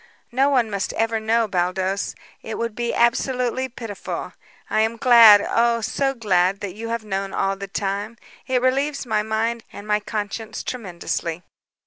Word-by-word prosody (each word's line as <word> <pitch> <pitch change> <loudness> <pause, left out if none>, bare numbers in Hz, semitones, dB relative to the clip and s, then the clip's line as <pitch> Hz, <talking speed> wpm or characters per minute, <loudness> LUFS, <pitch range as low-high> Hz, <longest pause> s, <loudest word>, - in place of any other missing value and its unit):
No 265 +3 +3
one 250 -5 +3
must 200 -1 -2
ever 225 0 0
know, 225 +1 +1
Baldos; 185 +1 -1 0.3
it 220 - -6
would 230 -1 -2
be 235 +1 -2
absolutely 250 +2 +1
pitiful. 230 -5 -6 0.3
I 215 - +1
am 225 +1 0
glad, 230 -5 +8
oh, 235 0 +2
so 270 +4 -1
glad, 195 -4 +2
that 200 -3 -4
you 225 +3 -6
have 230 -1 -3
known 195 -1 -3
all 195 0 0
the 200 0 -7
time. 200 +3 -3 0.3
It 255 -1 +1
relieves 275 +2 +1
my 215 -3 +1
mind 220 +2 -1
and 205 - -10
my 210 0 +2
conscience 215 +1 -5
tremendously." 175 -6 -4
220 Hz, 160 wpm, -22 LUFS, 200-235 Hz, 0.3 s, glad